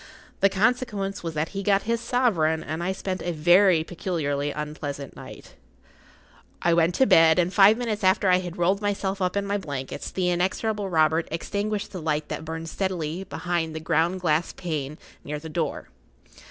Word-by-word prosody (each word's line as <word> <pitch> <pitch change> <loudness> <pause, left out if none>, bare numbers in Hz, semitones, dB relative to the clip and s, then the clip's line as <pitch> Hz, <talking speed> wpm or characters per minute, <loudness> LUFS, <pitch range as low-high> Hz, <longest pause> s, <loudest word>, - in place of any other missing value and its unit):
The 195 - +5
consequence 205 -1 0
was 165 -2 -5
that 155 +1 -1
he 195 - -4
got 200 -1 +2
his 230 +1 -1
sovereign, 200 -11 +1
and 160 +2 -4
I 180 +2 -1
spent 190 -1 -4
a 175 - -2
very 175 +1 +4
peculiarly 155 -5 -2
unpleasant 145 -2 -5
night.[Pg - - -10
40] - - -18 1.1
I 170 - +4
went 170 +1 +3
to 265 - +4
bed, 165 -5 +6
and 180 +1 +1
five 200 +3 +6
minutes 225 -4 -3
after 190 +1 +3
I 180 0 +5
had 180 -1 -6
rolled 185 +4 +1
myself 200 -1 -2
up 180 +2 0
in 200 - 0
my 200 +1 -1
blankets 140 -7 -5
the 180 -1 0
inexorable 195 +3 -1
Robert 160 -1 +2
extinguished 205 +5 -3
the 185 - -6
light 155 -1 -1
that 160 - -5
burned 160 +1 -5
steadily 180 -2 -3
behind 165 -2 -2
the - - -3
ground 170 +3 0
glass 160 -1 +1
pane 155 -4 -4 0.3
near 150 +1 -4
the 160 +2 -8
door. 155 -1 -3
175 Hz, 180 wpm, -25 LUFS, 160-195 Hz, 1.1 s, bed